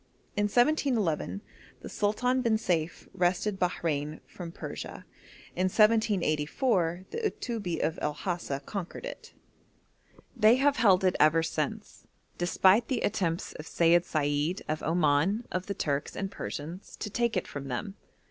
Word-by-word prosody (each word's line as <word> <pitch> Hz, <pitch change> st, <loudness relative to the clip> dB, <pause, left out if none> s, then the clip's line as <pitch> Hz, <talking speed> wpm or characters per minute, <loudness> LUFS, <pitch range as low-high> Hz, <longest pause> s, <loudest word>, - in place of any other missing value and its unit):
In 205 Hz, -, +2 dB
1711 215 Hz, -, +1 dB, 0.4 s
the -, -, -8 dB
Sultan 250 Hz, +5 st, +1 dB
bin 230 Hz, -3 st, +2 dB
Seif 175 Hz, -6 st, -2 dB
wrested 190 Hz, +2 st, 0 dB
Bahrein 155 Hz, -4 st, -1 dB
from 175 Hz, -2 st, -8 dB
Persia; -, -, -7 dB, 0.5 s
in 185 Hz, -, +1 dB
1784 185 Hz, -, +2 dB
the -, -, -3 dB
Uttubbi 225 Hz, -, -2 dB
of 160 Hz, -, -2 dB
El 150 Hz, -, 0 dB
Hasa 170 Hz, -7 st, -3 dB
conquered 195 Hz, -4 st, -5 dB
it. -, -, -9 dB, 1.0 s
They 225 Hz, -1 st, +6 dB
have 280 Hz, +2 st, +3 dB
held 195 Hz, -5 st, +5 dB
it 185 Hz, -1 st, +3 dB
ever 155 Hz, +2 st, +5 dB
since, -, -, -4 dB, 0.3 s
despite 190 Hz, +6 st, +4 dB
the 250 Hz, -3 st, -1 dB
attempts 170 Hz, -4 st, -1 dB
of 155 Hz, -, -9 dB
Seyid 170 Hz, +1 st, +4 dB
Said 150 Hz, +2 st, -1 dB
of 155 Hz, 0 st, -2 dB
Oman, 165 Hz, +7 st, +2 dB
of 185 Hz, 0 st, -3 dB
the 200 Hz, -, -3 dB
Turks 145 Hz, -3 st, -2 dB
and 195 Hz, 0 st, -3 dB
Persians, 165 Hz, +6 st, -7 dB
to 210 Hz, -, -6 dB
take 235 Hz, +1 st, 0 dB
it -, -, -1 dB
from 140 Hz, -1 st, -6 dB
them. 165 Hz, -, -4 dB
180 Hz, 140 wpm, -29 LUFS, 160-215 Hz, 1.0 s, They